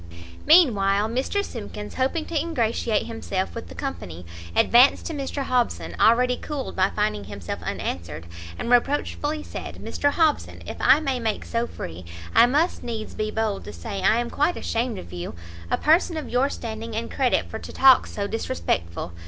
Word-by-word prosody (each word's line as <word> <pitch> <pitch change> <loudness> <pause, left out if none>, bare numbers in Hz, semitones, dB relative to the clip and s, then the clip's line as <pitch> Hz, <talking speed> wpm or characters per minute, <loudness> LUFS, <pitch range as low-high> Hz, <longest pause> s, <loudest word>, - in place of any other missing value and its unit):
Meanwhile 215 - +5
Mr 270 - -1
Simkins, 210 -2 -7
hoping 270 +5 0
to 335 - -7
ingratiate 235 -8 0
himself 200 -5 -3
with 90 - -7
the 85 - -10
company, 85 0 -6 0.3
advanced 245 +4 +5
to 330 - -3
Mr 275 -1 -3
Hobson, 250 -2 0
already 250 +2 +4
cooled 290 -3 -5
by 190 +1 +3
finding 210 - -1
himself 100 -3 -6
unanswered, 85 -2 -4 0.3
and 235 - -3
reproachfully 290 +4 +1
said - - -7
"Mr 285 - -1
Hobson, 310 0 0
if - - -6
I 275 +4 +5
may 270 -4 -1
make 220 -3 -2
so 235 +1 -1
free, 85 - -7 0.3
I 235 - +7
must 300 +8 +1
needs 225 -2 -5
be 215 0 -2
bold 215 -2 -1
to 105 - -8
say 85 +3 -5
I 220 - +4
am 240 0 -2
quite 295 +5 +1
ashamed 230 0 -1
of 85 +1 -9
you! 90 -1 -5 0.3
a - - +2
person 330 +2 +3
of 310 - -4
your 255 +3 +2
standing 225 -3 -6
and 230 +1 -3
credit 260 -3 +1
for 220 - -6
to - - -9
talk 265 -1 +6
so 200 - -4
disrespectful! 85 - -2
230 Hz, 175 wpm, -24 LUFS, 200-275 Hz, 0.3 s, I